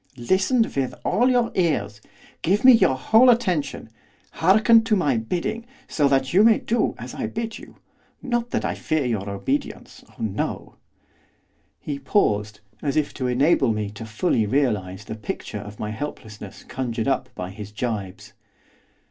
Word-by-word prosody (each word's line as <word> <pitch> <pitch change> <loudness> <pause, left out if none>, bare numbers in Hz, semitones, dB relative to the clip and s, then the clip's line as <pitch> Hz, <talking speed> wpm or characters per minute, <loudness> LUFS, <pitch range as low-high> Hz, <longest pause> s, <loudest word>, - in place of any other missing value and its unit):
'Listen 190 - +2
with 135 - -3
all 245 +3 +3
your 245 -2 +2
ears. 150 - -1 0.4
Give 200 +7 +1
me 260 - +11
your 190 - +4
whole 225 - +5
attention. 180 - 0 0.4
Hearken 215 +6 +4
to 220 -2 +2
my 145 - +1
bidding, 180 - -3 0.2
so 145 -3 +1
that 135 -1 +1
you 190 - +6
may 225 -1 +6
do 235 - -1
as - - -8
I - - -3
bid 225 0 -5
you. - - -14 0.4
Not 240 -2 -2
that - - -2
I - - -1
fear 155 -3 -1
your 105 -5 -2
obedience, 270 - -4
oh - - -22
no!' - - -3 1.1
He 145 -4 -5
paused, 105 - 0 0.2
as 140 +1 -1
if 150 - 0
to 130 -2 -3
enable 135 0 +3
me 105 -1 -3
to 110 +2 -9
fully 110 - 0
realise 105 -7 -1
the 110 - -7
picture 105 -1 -6
of 105 +1 -10
my 105 - -3
helplessness 110 -5 -8
conjured 120 -2 -3
up 135 - 0
by 90 0 -5
his 105 0 -9
jibes. 105 -3 -5
135 Hz, 160 wpm, -23 LUFS, -, 1.1 s, me